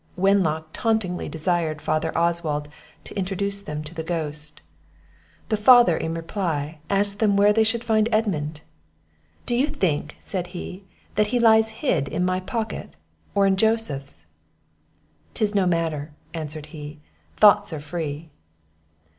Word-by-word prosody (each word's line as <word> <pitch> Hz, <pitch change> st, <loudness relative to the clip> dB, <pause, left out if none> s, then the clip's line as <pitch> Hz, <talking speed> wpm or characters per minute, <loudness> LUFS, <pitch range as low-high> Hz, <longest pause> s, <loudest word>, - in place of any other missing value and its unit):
Wenlock 180 Hz, -5 st, +2 dB
tauntingly 220 Hz, -6 st, -1 dB
desired 160 Hz, -1 st, -1 dB
Father 155 Hz, +1 st, -1 dB
Oswald 165 Hz, -3 st, 0 dB, 0.4 s
to -, -, -11 dB
introduce 200 Hz, +1 st, -2 dB
them 150 Hz, -5 st, -5 dB
to 155 Hz, +2 st, -9 dB
the 165 Hz, -, -4 dB
ghost. 150 Hz, -2 st, -5 dB, 0.9 s
The 215 Hz, -, +1 dB
father, 235 Hz, -4 st, +7 dB
in 160 Hz, +1 st, -3 dB
reply, 165 Hz, -3 st, -3 dB
asked 200 Hz, 0 st, +4 dB
them 205 Hz, -3 st, +3 dB
where 205 Hz, +1 st, +5 dB
they 220 Hz, +1 st, +4 dB
should 225 Hz, +1 st, 0 dB
find 220 Hz, -1 st, +2 dB
Edmund. 160 Hz, -9 st, -1 dB, 0.8 s
"Do 240 Hz, -, 0 dB
you 265 Hz, +4 st, +2 dB
think," 155 Hz, -, -1 dB
said 180 Hz, -3 st, -3 dB
he, 185 Hz, +2 st, -8 dB, 0.3 s
"that 210 Hz, +1 st, +2 dB
he 245 Hz, +3 st, 0 dB
lies 220 Hz, -1 st, +5 dB, 0.2 s
hid 155 Hz, -, +1 dB
in 175 Hz, +5 st, -1 dB
my 185 Hz, 0 st, 0 dB
pocket, 220 Hz, +4 st, -5 dB, 0.4 s
or 200 Hz, -1 st, +4 dB
in 190 Hz, -1 st, +3 dB
Joseph's?" 150 Hz, -, +1 dB, 1.1 s
"'Tis 215 Hz, -1 st, +1 dB
no 195 Hz, -3 st, +2 dB
matter," 160 Hz, -3 st, -1 dB, 0.2 s
answered 155 Hz, -2 st, -5 dB
he; 150 Hz, -1 st, -8 dB, 0.4 s
"thoughts 205 Hz, -1 st, +6 dB
are 155 Hz, -, -4 dB
free." 155 Hz, 0 st, -5 dB
180 Hz, 140 wpm, -24 LUFS, 155-205 Hz, 1.1 s, father